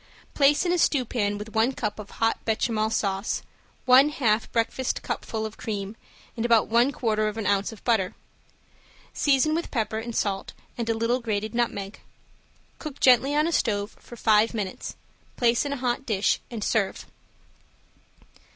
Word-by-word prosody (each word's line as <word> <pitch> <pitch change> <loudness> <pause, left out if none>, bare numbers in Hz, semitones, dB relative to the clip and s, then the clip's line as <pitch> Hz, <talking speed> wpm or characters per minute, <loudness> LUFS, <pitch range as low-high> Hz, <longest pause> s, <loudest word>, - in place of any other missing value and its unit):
Place 290 +3 +4
in 350 - +1
a 355 - +1
stewpan 235 -9 +1
with 210 +1 -8
one 225 +4 +2
cup 210 -4 -3
of 210 - -8
hot 225 0 -1
bechamel 220 -1 0
sauce, 200 -2 -1 0.4
one 265 +3 +7
half 230 -6 0
breakfast 235 +2 -1
cupful 220 -1 -3
of 220 0 -7
cream 205 -1 -4 0.4
and 230 - -3
about 230 -2 +4
one 240 +4 +3
quarter 215 -5 0
of 215 +1 -4
an 220 - -3
ounce 200 +2 +1
of 220 - -13
butter. 220 -6 +1 1.0
Season 290 +2 +2
with 335 +2 -2
pepper 220 -3 -1
and 230 0 -6
salt 195 -2 -1 0.2
and 235 -1 -3
a 225 - +2
little 235 +3 +1
grated 215 -2 -3
nutmeg. 225 -4 -2 0.8
Cook 300 -3 -7
gently 265 +3 +5
on 300 +1 +3
a 335 - 0
stove 205 -8 0
for 240 - -12
five 220 0 +3
minutes, 200 -4 -4 0.4
place 235 +2 +2
in 285 - -2
a - - -3
hot 250 +1 -1
dish 215 -5 +1
and 225 -4 -5
serve. 210 -4 0
225 Hz, 165 wpm, -25 LUFS, 215-250 Hz, 1.0 s, one